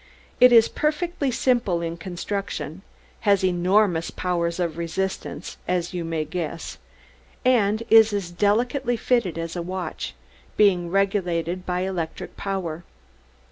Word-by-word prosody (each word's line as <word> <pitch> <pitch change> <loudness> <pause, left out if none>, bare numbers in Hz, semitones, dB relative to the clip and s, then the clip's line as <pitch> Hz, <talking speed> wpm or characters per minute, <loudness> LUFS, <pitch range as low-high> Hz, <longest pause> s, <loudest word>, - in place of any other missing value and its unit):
"It 250 0 +8
is 230 -2 +7
perfectly 305 -1 -1
simple 235 -9 +1
in 165 0 -3
construction, 175 -2 -5 0.4
has 200 -3 +3
enormous 180 -1 +2
powers 170 -1 -1
of 170 -2 -2
resistance, 190 +3 -4
as 180 -1 -1
you 175 -1 -2
may 165 -2 -2
guess, 165 0 -5 0.7
and 220 -3 +3
is 220 -1 +7
as 200 -4 -3
delicately 240 +7 +1
fitted 220 -8 +1
as 165 +1 -4
a 175 - -2
watch, 185 +1 -5 0.4
being 180 -5 +4
regulated 185 -2 0
by 180 0 0
electric 185 -4 -4
power. 175 -4 -4
185 Hz, 125 wpm, -24 LUFS, 170-215 Hz, 0.7 s, It